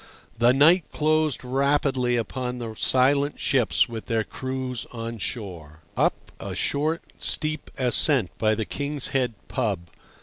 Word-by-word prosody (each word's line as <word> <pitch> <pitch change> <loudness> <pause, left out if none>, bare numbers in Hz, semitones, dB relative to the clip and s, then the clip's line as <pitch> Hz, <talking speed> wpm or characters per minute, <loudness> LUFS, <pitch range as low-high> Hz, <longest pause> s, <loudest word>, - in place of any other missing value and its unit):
The 120 +1 +5
night 155 +6 +5
closed 155 -2 +1
rapidly 135 -2 +1
upon 125 +2 -3
the 115 -2 -6
silent 140 +5 +2
ships 125 -5 +2
with 115 -2 -8
their 115 -1 0
crews 130 +1 -5
on 115 -1 -6
shore. 85 -9 -6
Up - - +2 0.2
a - - -6
short, 155 +4 -1 0.2
steep 155 -1 -1
ascent 130 - +4
by 110 -1 +2
the 110 0 -3
King's 145 +2 -1
Head 125 -4 0
pub. 100 - -3
125 Hz, 135 wpm, -24 LUFS, 115-140 Hz, 0.2 s, The